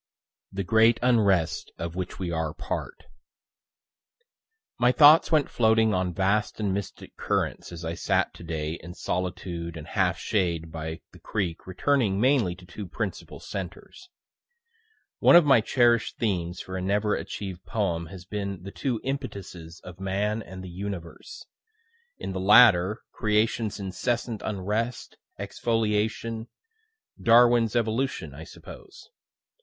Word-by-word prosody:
THE 100 0 -3
GREAT 110 +4 +4
UNREST 100 -10 +2
OF 85 0 -5
WHICH 90 -1 -5
WE 90 -2 -3
ARE 80 -1 -2
PART - - -5 1.8
My 120 0 +5
thoughts 150 +5 +7
went 155 -3 +3
floating 110 -1 +3
on 90 -1 0
vast 100 +5 0
and 100 -3 0
mystic 100 -1 -6
currents - - -2
as 85 -1 -7
I 80 - -2
sat - - 0
to - - -12
day 80 -1 -4
in 90 0 -10
solitude 85 -2 -4
and 75 - -8
half 95 -1 0
shade 85 -6 -1
by 80 0 -6
the - - -16
creek 95 -6 -3
returning 100 +1 +1
mainly 120 -7 +2
to 90 0 -15
two 95 +3 -8
principal - - -5
centres. 100 - -8 1.1
One - - +7
of 175 -2 +8
my 135 -5 +6
cherish'd 120 0 +2
themes 90 -5 -2
for 95 - -7
a - - -3
never 105 +3 +1
achiev'd 95 -3 -6
poem 85 -6 -1
has 90 +1 -11
been 100 -2 -5
the 100 - -7
two 125 -1 -2
impetuses 95 -11 -6
of 90 0 -11
man 100 +3 -1
and 95 -2 -9
the 90 - -8
universe 95 - -7 0.7
in - - -5
the 95 - -3
latter, 105 -1 +6
creation's 110 0 0
incessant 110 +4 -2
unrest, 105 +4 -3 0.2
exfoliation, 110 0 -1 0.7
(Darwin's 120 -1 +5
evolution, 120 +4 -1
I - - -9
suppose.) 440 -1 -13
100 Hz, 135 wpm, -26 LUFS, 90-115 Hz, 1.8 s, of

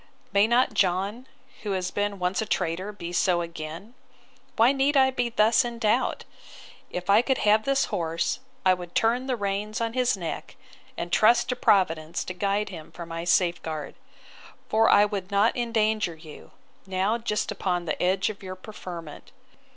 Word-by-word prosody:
May 200 +2 +5
not 240 +2 +3
John, 200 +7 0 0.3
who 205 -2 -2
has 185 -1 -2
been 205 0 -1
once 180 +3 -1
a 220 - -3
traitor, 185 +5 -1
be 175 -4 -7
so 175 -1 +2
again?—Why 170 +8 -3
need 280 +1 +2
I 265 -1 +5
be 245 -2 -1
thus 225 0 +4
in 240 -1 -5
doubt?—If 215 -5 -3
I 200 +3 +6
could 265 +1 0
have 215 +1 +3
this 275 0 +2
horse, 165 +4 -1 0.3
I 185 - +6
would 175 -1 -7
turn 240 +3 +2
the 255 - 0
reins 205 0 -2
on 230 -1 -2
his 250 -3 +1
neck, 170 -3 -6 0.4
and 175 0 -4
trust 230 +6 +4
to 250 - 0
Providence 165 -7 +1
to 185 - -6
guide 200 +3 -1
him 165 -4 -10
for 170 - -8
my 165 0 -5
safeguard! 170 -4 0 0.8
For 220 +1 +4
I 205 - +6
would 200 -3 -4
not 205 +3 +2
endanger 220 -6 0
you, 155 -1 -13 0.4
now 195 +5 0
just 210 -2 -2
upon 180 -2 -2
the 155 - -3
edge 190 +3 +1
of 205 - -14
your 185 -1 -7
preferment. 180 -5 -9
200 Hz, 165 wpm, -26 LUFS, 175-225 Hz, 0.8 s, I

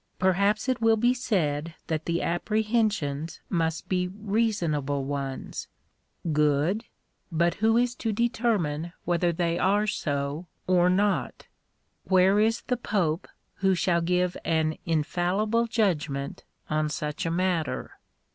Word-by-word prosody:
Perhaps 200 +5 +2
it 255 -2 0
will 225 0 +4
be 240 +3 +3
said 165 - -1
that 160 -1 -2
the 170 0 0
apprehensions 210 -6 0
must 165 -3 -1
be 180 -1 0
reasonable 180 -9 -1
ones. 140 -1 -4 0.7
Good; 150 +8 +2 0.5
but 170 +1 +2
who 225 +1 +4
is 245 0 +2
to 225 - -1
determine 205 -9 0
whether 175 0 +2
they 170 0 0
are 205 +3 +3
so 145 -3 -2 0.2
or 180 -1 +4
not? 200 +3 0 0.6
Where 190 +2 +4
is 225 +2 +2
the 250 - -1
pope 180 -8 -1 0.3
who 190 -1 +2
shall 170 -1 +2
give 180 +1 +1
an 160 -1 +1
infallible 180 +8 +1
judgment 155 - -1 0.2
on 155 0 0
such 150 +1 -3
a - - +1
matter 165 -6 -1
180 Hz, 125 wpm, -27 LUFS, 155-210 Hz, 0.7 s, will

